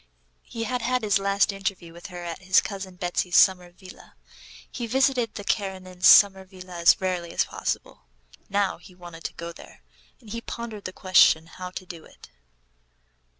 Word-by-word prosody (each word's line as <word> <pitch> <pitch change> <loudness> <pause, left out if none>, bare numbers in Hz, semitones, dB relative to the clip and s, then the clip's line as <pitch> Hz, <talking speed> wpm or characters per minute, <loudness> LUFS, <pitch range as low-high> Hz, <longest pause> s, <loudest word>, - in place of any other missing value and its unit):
He 230 - -6
had 250 +1 -2
had 255 0 0
his 205 -2 +2
last 200 +1 +1
interview 195 -4 -5
with 170 - -10
her 175 -2 -9
at 170 -1 -6
his 185 0 +4
cousin 195 -2 -6
Betsy's 180 -1 -1
summer 180 -2 +4
villa. 185 +1 -15 0.6
He 240 -2 -5
visited 255 -2 +1
the 205 - -6
Karenins' 185 -3 -1
summer 195 -2 +7
villa 185 -2 -11
as 170 - +5
rarely 180 -2 -3
as - - +1
possible. 65 - -5 0.4
Now 200 0 0
he 180 - -16
wanted 175 -2 -12
to - - -4
go 170 0 -7
there, 160 - -15 0.4
and 215 - -14
he 230 +1 -4
pondered 230 -3 -7
the 185 - -4
question 185 -4 +4
how 180 +2 -9
to 185 +1 -8
do 170 -3 -10
it. - - -17
185 Hz, 175 wpm, -25 LUFS, 175-205 Hz, 0.6 s, summer